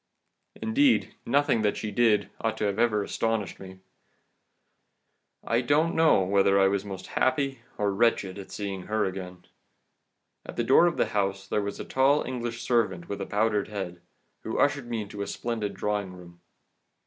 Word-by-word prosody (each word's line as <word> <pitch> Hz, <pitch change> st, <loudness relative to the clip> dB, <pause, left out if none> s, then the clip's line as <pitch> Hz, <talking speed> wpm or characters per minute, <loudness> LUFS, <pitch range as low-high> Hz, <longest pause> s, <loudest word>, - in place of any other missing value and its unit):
"Indeed, 260 Hz, +4 st, +2 dB
nothing 135 Hz, -3 st, +2 dB
that 105 Hz, -1 st, +1 dB
she 110 Hz, -, -4 dB
did 105 Hz, -2 st, +2 dB
ought 110 Hz, -1 st, -2 dB
ever 100 Hz, -2 st, 0 dB
to 110 Hz, -, 0 dB
have 120 Hz, -2 st, +3 dB
astonished 115 Hz, -4 st, -2 dB
me. 95 Hz, -1 st, -11 dB, 1.6 s
I 115 Hz, +1 st, +1 dB
don't 150 Hz, +6 st, +2 dB
know 160 Hz, -11 st, +4 dB
whether 100 Hz, +1 st, +3 dB
I 95 Hz, -, +5 dB
was 100 Hz, 0 st, -1 dB
most 95 Hz, -2 st, -7 dB
happy 135 Hz, 0 st, 0 dB, 0.2 s
or 100 Hz, -1 st, 0 dB
wretched 100 Hz, -3 st, +1 dB
at 95 Hz, -, -9 dB
seeing 95 Hz, -1 st, -5 dB
her 110 Hz, 0 st, +1 dB
again. 90 Hz, -1 st, -6 dB, 1.0 s
At -, -, -9 dB
the 120 Hz, -, 0 dB
door 135 Hz, +8 st, +6 dB
of 170 Hz, -, -1 dB
the -, -, +1 dB
house 95 Hz, -1 st, -1 dB
there 105 Hz, -, 0 dB
was 100 Hz, 0 st, -5 dB
a -, -, -5 dB
tall 135 Hz, +3 st, +3 dB
English 120 Hz, -2 st, -4 dB
servant 105 Hz, -8 st, 0 dB
with 100 Hz, -, -4 dB
a -, -, -4 dB
powdered 105 Hz, 0 st, +1 dB
head, 95 Hz, -4 st, -6 dB, 0.4 s
who -, -, -4 dB
ushered 140 Hz, -3 st, +1 dB
me 115 Hz, -2 st, -2 dB
into 100 Hz, 0 st, -8 dB
a 100 Hz, -, -3 dB
splendid 115 Hz, -4 st, -3 dB
drawing 105 Hz, -3 st, -2 dB
room. 85 Hz, -1 st, -14 dB
105 Hz, 170 wpm, -27 LUFS, 95-120 Hz, 1.6 s, door